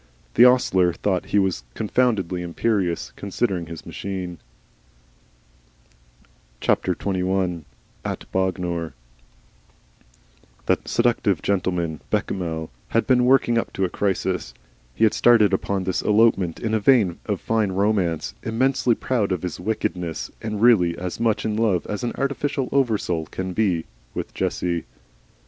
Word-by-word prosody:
The 120 - +7
ostler 95 -8 +4
thought 95 -1 -1
he - - +1
was 95 -10 +1
confoundedly 105 -6 0
imperious, 90 0 -1
considering 95 -4 -2
his 85 -1 -9
machine. 90 -3 -5 2.2
XXI. 95 -3 0 0.4
AT - - -5
BOGNOR 90 -3 -1 1.7
That - - 0
seductive 115 -7 +1
gentleman, 90 -5 -1
Bechamel, 80 -4 -2 0.2
had 115 - +1
been 125 -2 +4
working 125 -2 +4
up - - -4
to 95 - 0
a - - -2
crisis. 95 -1 -1 0.4
He - - 0
had 110 - +5
started 110 -5 +5
upon 95 0 0
this 90 -2 -1
elopement 105 -5 +3
in 110 -2 -2
a 110 - +3
vein 105 -6 +3
of 105 -3 -1
fine 110 -3 0
romance, 95 -4 0
immensely 120 +1 +1
proud 110 -6 -1
of 90 -2 -1
his 90 - -4
wickedness, 90 -4 -3
and 105 -1 -3
really 90 -8 +5
as 90 0 -5
much 115 -2 +1
in 110 -1 0
love 105 -6 +1
as 105 +3 -4
an 120 - -1
artificial 140 -1 -1
oversoul 105 - 0
can 95 0 -5
be, 90 -6 +1 0.3
with - - -5
Jessie. 85 -2 -1
95 Hz, 130 wpm, -23 LUFS, 90-115 Hz, 2.2 s, The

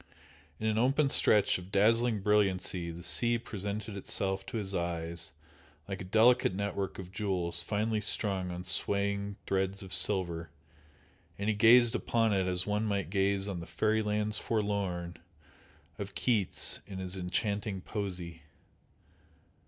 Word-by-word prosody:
In 110 - -4
an 110 0 +1
open 135 +4 +3
stretch 105 -7 +4
of 90 +2 -12
dazzling 115 +2 +3
brilliancy 95 -4 +1
the 85 +1 -8
sea 120 +5 +4
presented 105 -1 -5
itself 95 0 0
to - - -4
his 100 -2 -4
eyes 85 -2 -2 0.6
like 95 -1 -5
a - - -6
delicate 110 +1 +4
network 100 -1 -3
of 95 -1 -8
jewels 95 -4 0
finely 105 +3 -1
strung 100 -3 -1
on 90 0 -5
swaying 100 +2 -1
threads 95 +1 -1
of 95 - -5
silver, 85 -4 0 0.9
and 100 +2 -1
he - - +3
gazed 115 +2 +6
upon 115 -2 +1
it 95 -2 +1
as 90 -1 0
one 105 +1 0
might 100 -4 -2
gaze 100 0 +1
on 95 -4 -4
the 85 - -8
"fairy 110 0 +1
lands 105 0 -1
forlorn" 100 -5 -2 0.8
of 100 -1 -6
Keats 110 -7 +1
in 95 -2 -7
his 95 0 -5
enchanting 100 +2 -2
poesy. 90 -5 -5
100 Hz, 145 wpm, -31 LUFS, 95-105 Hz, 0.9 s, gazed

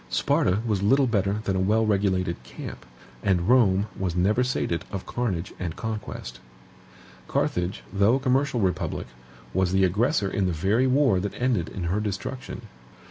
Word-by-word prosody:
Sparta 95 +4 +1
was 105 -4 0
little 135 +7 +4
better 100 -5 +1
than 95 -2 -1
a - - +1
wellregulated 95 - +1
camp; - - -9 0.3
and 90 -2 +1
Rome 105 -6 +4
was 90 -3 -2
never 105 +7 +2
sated 85 -9 -1
of 95 -2 -5
carnage 100 -8 -2
and 85 -3 -3
conquest. 105 - -5 0.9
Carthage, 90 +2 -1
though 100 +4 +4
a - - 0
commercial 130 -1 +1
republic, 95 -2 -1 0.5
was 95 0 +1
the 95 0 +4
aggressor 105 - +1
in 95 -1 0
the 90 - 0
very 100 +11 +2
war 130 -7 +3
that 100 +2 -4
ended 120 -10 +1
in 95 - -5
her 90 +5 0
destruction. 105 +5 -5
100 Hz, 155 wpm, -25 LUFS, 90-120 Hz, 0.9 s, little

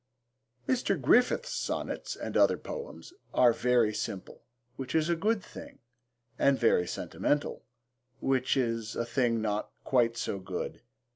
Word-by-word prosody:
Mr. 220 -8 +1
Griffiths' 250 - +3
Sonnets - - -3
and - - -6
Other - - +5
Poems 470 -7 -8 0.2
are 120 -2 +6
very 120 -2 +2
simple, 100 -3 -5 0.3
which 130 +1 -5
is 160 +1 +2
a 170 - +3
good 205 +4 0
thing, - - -11 0.6
and 140 -1 +4
very 90 -7 +3
sentimental, 145 +9 -1 0.6
which 130 0 +1
is 115 -3 -1
a 120 - -1
thing 120 -2 +1
not 105 -1 -1
quite 120 -3 +2
so 100 - -2
good. 95 -1 -5
125 Hz, 135 wpm, -30 LUFS, 115-155 Hz, 0.6 s, are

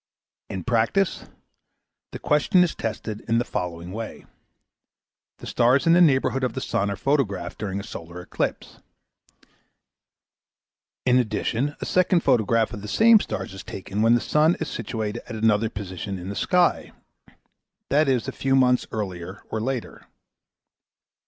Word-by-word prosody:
In 95 - -5
practice, 125 - +1 0.9
the - - -6
question 150 +5 +3
is 175 - -1
tested 110 -1 -5
in 115 0 +2
the 120 - +1
following 85 -3 -4
way. 110 +2 -7 1.1
The - - -11
stars 125 +5 +2
in 165 - +5
the 175 - +6
neighbourhood 135 -4 +3
of 125 -3 0
the - - -3
sun 100 +1 -1
are 100 - -2
photographed 100 -8 -1
during 100 -2 -3
a - - -6
solar 85 -5 -8
eclipse. 90 - -4 2.3
In 125 0 +4
addition, 120 +4 -1
a - - -3
second 180 -1 +2
photograph 115 -4 +2
of 105 - -6
the 105 - -7
same 225 - +6
stars 95 - -5
is 95 - -9
taken 100 +2 -5
when 115 +2 +5
the 120 - +1
sun 155 +3 +3
is 160 - -3
situated 110 0 -4
at 115 - -5
another 110 0 +2
position 95 -2 -6
in 90 +1 -7
the 100 - -5
sky, 175 - +1 1.0
i.e. 150 0 +3
a 130 +1 -1
few 135 0 0
months 125 -1 +3
earlier 95 -3 -5
or 110 - -2
later. 130 0 -4
115 Hz, 150 wpm, -24 LUFS, 100-135 Hz, 2.3 s, the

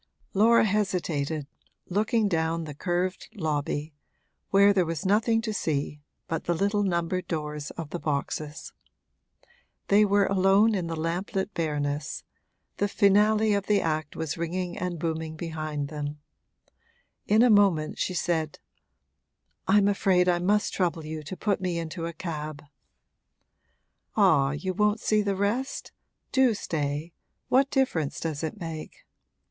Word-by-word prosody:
Laura 225 +3 +5
hesitated, 170 -8 -1 0.4
looking 215 +3 +1
down 165 -2 0
the 150 -2 -7
curved 180 +4 -2
lobby, 150 -3 -2 0.6
where 200 +1 +6
there 190 -2 +3
was 165 +2 -4
nothing 225 +3 +2
to 220 -2 -2
see 150 -5 -2 0.3
but 165 - -3
the 175 - +1
little 200 +3 +1
numbered 180 -1 -1
doors 150 -3 -4
of 165 -3 -6
the 175 - -3
boxes. 150 0 -3 1.2
They 205 +1 +6
were 205 -1 +3
alone 195 +3 +4
in 180 -4 -1
the 165 - -3
lamplit 180 +5 -2
bareness; 145 -3 -2 0.5
the 205 - +1
finale 210 +2 +4
of 200 -1 -1
the 210 -1 +4
act 155 -2 -2
was 160 0 -3
ringing 175 +1 -2
and 180 -1 -3
booming 160 0 -3
behind 155 -3 -4
them. 150 -1 -5 1.1
In 215 +3 +5
a 245 - +5
moment 190 -7 +3
she 185 - -1
said: 160 -3 -1 1.1
'I'm 200 +1 +5
afraid 190 -2 +3
I 175 -1 +3
must 205 +4 +1
trouble 170 -4 -1
you 155 0 -5
to 150 +5 -7
put 200 -3 0
me 180 -2 -1
into 165 +1 -4
a 170 - -6
cab.' 155 -3 -5 1.5
'Ah, 135 -3 +4
you 185 +6 -3
won't 210 +3 +2
see 215 0 +2
the 200 -1 0
rest? 215 +8 -2 0.4
Do 260 -4 +4
stay 150 -2 -3 0.4
what 270 +2 +4
difference 170 - 0
does 155 -3 -3
it 160 +7 -4
make?' 165 -3 -7
175 Hz, 140 wpm, -27 LUFS, 155-200 Hz, 1.5 s, where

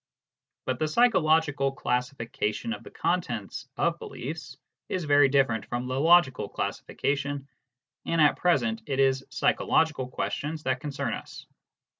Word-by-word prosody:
But 130 -1 -2
the 155 - +1
psychological 155 - +3
classification 125 - -2
of - - -7
the - - -11
contents 120 - -2
of - - +1
beliefs - - -7 0.3
is 185 - -2
very 145 -2 +5
different 130 -6 +2
from 120 +1 -3
the 130 +1 -2
logical 165 -4 +4
classification, 140 0 -2 0.6
and 165 - +1
at 150 -2 +5
present 120 -10 +1
it 135 -1 -2
is 135 -1 +3
psychological 155 -5 +1
questions 150 +4 -3
that 130 -2 0
concern 145 -2 -3
us. - - -8
140 Hz, 130 wpm, -27 LUFS, 130-155 Hz, 0.6 s, very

